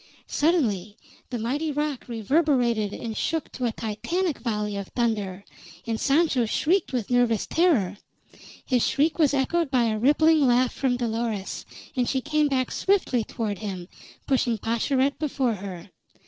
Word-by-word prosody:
Suddenly 220 Hz, -, 0 dB, 0.3 s
the 250 Hz, -, -3 dB
mighty 280 Hz, +8 st, -1 dB
rock 295 Hz, -2 st, -2 dB
reverberated 240 Hz, -3 st, +1 dB
and 225 Hz, 0 st, -5 dB
shook 320 Hz, +4 st, -2 dB
to 255 Hz, -, -3 dB
a 235 Hz, -, +1 dB
Titanic 280 Hz, -, -2 dB
volley 210 Hz, -3 st, -2 dB
of 200 Hz, -1 st, -4 dB
thunder, 205 Hz, -5 st, -2 dB, 0.4 s
and 225 Hz, -1 st, -2 dB
Sancho 280 Hz, -4 st, +2 dB
shrieked 340 Hz, -, +1 dB
with 245 Hz, -3 st, -2 dB
nervous 245 Hz, -3 st, +2 dB
terror. 230 Hz, -, +2 dB, 0.7 s
His 250 Hz, -3 st, +2 dB
shriek 310 Hz, +4 st, +1 dB
was 290 Hz, -3 st, +4 dB
echoed 320 Hz, +4 st, +1 dB
by 255 Hz, -3 st, +3 dB
a 220 Hz, -2 st, 0 dB
rippling 300 Hz, +3 st, +4 dB
laugh 245 Hz, 0 st, +3 dB
from 255 Hz, -2 st, 0 dB
Dolores, 225 Hz, -4 st, -3 dB, 0.3 s
and 250 Hz, -2 st, +1 dB
she 265 Hz, -, +1 dB
came 300 Hz, +3 st, +1 dB
back 260 Hz, -2 st, 0 dB
swiftly 375 Hz, -, +1 dB
toward 210 Hz, -3 st, -4 dB
him, 190 Hz, -4 st, -5 dB, 0.4 s
pushing 245 Hz, -4 st, +1 dB
Pascherette 260 Hz, +6 st, 0 dB
before 270 Hz, -5 st, 0 dB
her. 190 Hz, -2 st, -8 dB
245 Hz, 145 wpm, -25 LUFS, 220-290 Hz, 0.7 s, was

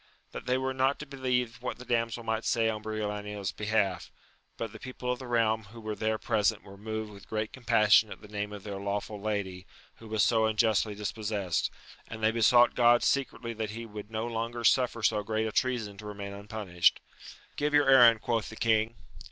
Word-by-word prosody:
That -, -, -8 dB
they 125 Hz, +1 st, +2 dB
were 130 Hz, 0 st, -1 dB
not 130 Hz, +1 st, +1 dB
to 150 Hz, -, -7 dB
believe 125 Hz, -4 st, -2 dB
what 125 Hz, -, -4 dB
the 125 Hz, -, -11 dB
damsel 115 Hz, -1 st, -1 dB
might 110 Hz, 0 st, -1 dB
say 115 Hz, -2 st, +2 dB
on 110 Hz, -1 st, -2 dB
Briolania's 105 Hz, -2 st, -4 dB
behalf: 105 Hz, -4 st, -1 dB, 0.5 s
but 115 Hz, -2 st, -4 dB
the -, -, -11 dB
people 125 Hz, -1 st, -4 dB
of 125 Hz, -, -3 dB
the 130 Hz, -, -8 dB
realm 110 Hz, -2 st, +1 dB
who 115 Hz, +4 st, -12 dB
were 110 Hz, -1 st, -4 dB
there 110 Hz, +1 st, -1 dB
present 110 Hz, -2 st, 0 dB
were 100 Hz, -1 st, -12 dB
moved 110 Hz, +1 st, -5 dB
with 100 Hz, 0 st, -14 dB
great 110 Hz, 0 st, -2 dB
compassion 110 Hz, -3 st, +4 dB
at -, -, -8 dB
the 105 Hz, -, -13 dB
name 105 Hz, 0 st, -4 dB
of 105 Hz, -2 st, -8 dB
their 100 Hz, -2 st, -5 dB
lawful 100 Hz, +1 st, -3 dB
lady, 100 Hz, -3 st, -3 dB, 0.3 s
who 115 Hz, -, -12 dB
was 110 Hz, -1 st, +1 dB
so 110 Hz, -2 st, +3 dB
unjustly 110 Hz, -1 st, +2 dB
dispossessed, 105 Hz, -3 st, -2 dB, 0.4 s
and 110 Hz, 0 st, -8 dB
they 110 Hz, -, +4 dB
besought 120 Hz, +2 st, +5 dB
God 120 Hz, 0 st, +5 dB
secretly 120 Hz, -4 st, 0 dB
that 110 Hz, -1 st, -4 dB
he 115 Hz, +2 st, -6 dB
would 105 Hz, -1 st, -9 dB
no 110 Hz, 0 st, -3 dB
longer 115 Hz, 0 st, -3 dB
suffer 125 Hz, -1 st, +3 dB
so 105 Hz, -1 st, +3 dB
great 110 Hz, +1 st, -1 dB
a 110 Hz, -, -2 dB
treason 115 Hz, -5 st, -1 dB
to 105 Hz, -, -8 dB
remain 100 Hz, -1 st, -6 dB
unpunished. 100 Hz, -3 st, +1 dB, 0.6 s
Give 150 Hz, +1 st, 0 dB
your 145 Hz, -1 st, +4 dB
errand, 120 Hz, -4 st, +7 dB
quoth 115 Hz, -3 st, -1 dB
the 110 Hz, -, -9 dB
king. 110 Hz, 0 st, +1 dB
110 Hz, 200 wpm, -29 LUFS, 105-120 Hz, 0.6 s, errand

